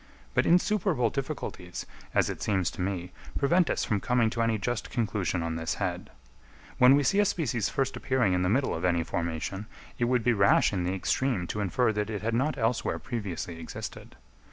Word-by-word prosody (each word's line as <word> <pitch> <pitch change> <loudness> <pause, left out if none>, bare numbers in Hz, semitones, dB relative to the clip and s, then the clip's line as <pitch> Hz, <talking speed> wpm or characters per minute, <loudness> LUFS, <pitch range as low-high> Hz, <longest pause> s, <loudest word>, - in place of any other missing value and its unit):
But - - +2
insuperable 175 - +2
difficulties, 130 - -5 0.3
as - - +4
it - - -5
seems 95 -4 +1
to - - -7
me, 90 -1 -2 0.3
prevent 170 +4 +3
us - - 0
from 105 - 0
coming 120 0 +2
to 115 - -1
any 115 -1 +2
just 120 +3 -3
conclusion 100 - -1
on 80 0 -2
this 80 0 -2
head. 90 -3 -3 0.7
When 125 +2 +8
we 145 - +3
see 195 +9 +2
a - - +6
species 130 - 0
first 135 -1 -1
appearing 125 -8 +1
in 90 - +1
the 90 - +1
middle 130 +6 +2
of 80 - -4
any 85 -2 +2
formation, 85 +5 -3 0.3
it 120 - +3
would 125 -1 +1
be 120 - +3
rash 100 0 +4
in 90 -3 -1
the 90 +2 -1
extreme 110 +1 0
to 105 - -3
infer 110 +4 +1
that 105 0 -2
it 105 -2 -4
had 115 +1 0
not 135 +6 +1
elsewhere 115 +1 0
previously 90 -8 -5
existed. 80 - -8
110 Hz, 200 wpm, -28 LUFS, 90-125 Hz, 0.7 s, When